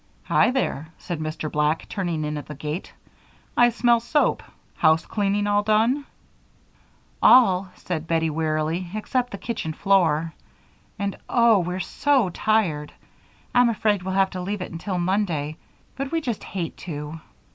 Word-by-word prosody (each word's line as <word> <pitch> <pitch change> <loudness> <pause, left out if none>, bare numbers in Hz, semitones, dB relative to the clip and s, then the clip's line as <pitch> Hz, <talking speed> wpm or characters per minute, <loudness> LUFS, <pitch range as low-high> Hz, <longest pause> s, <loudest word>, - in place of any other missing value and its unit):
"Hi - - +3
there!" 250 - -1
said 175 -3 -5
Mr. 155 0 -4
Black, 150 +2 0
turning 170 -6 -2
in 150 0 -3
at 145 - -6
the 150 - -7
gate. 150 +6 -5 0.6
"I 240 0 +6
smell 235 0 +3
soap. 290 +6 +1 0.3
Housecleaning 200 +6 +2
all 205 0 +2
done?" 225 +7 +2 1.2
"All," 195 -7 +6
said 165 -3 -4
Bettie, 165 -1 +1
wearily, 160 +3 -1
"except 245 +3 -1
the 200 - -6
kitchen 210 -8 -4
floor, 165 -4 +2 0.6
and, 200 -1 -3
oh! 235 -3 +5
we're 180 +1 -2
so 265 0 +1
tired. 170 -9 0 0.6
I'm 245 -1 +5
afraid 210 -3 +1
we'll 190 +1 -3
have 195 0 +3
to 185 - -5
leave 200 +2 -3
it - - -8
until 180 +3 -4
Monday, 175 -5 -1 0.4
but 275 0 -4
we 330 - +1
just 240 -9 -4
hate 175 -4 -5
to." 155 -1 -6
185 Hz, 145 wpm, -24 LUFS, 160-215 Hz, 1.2 s, I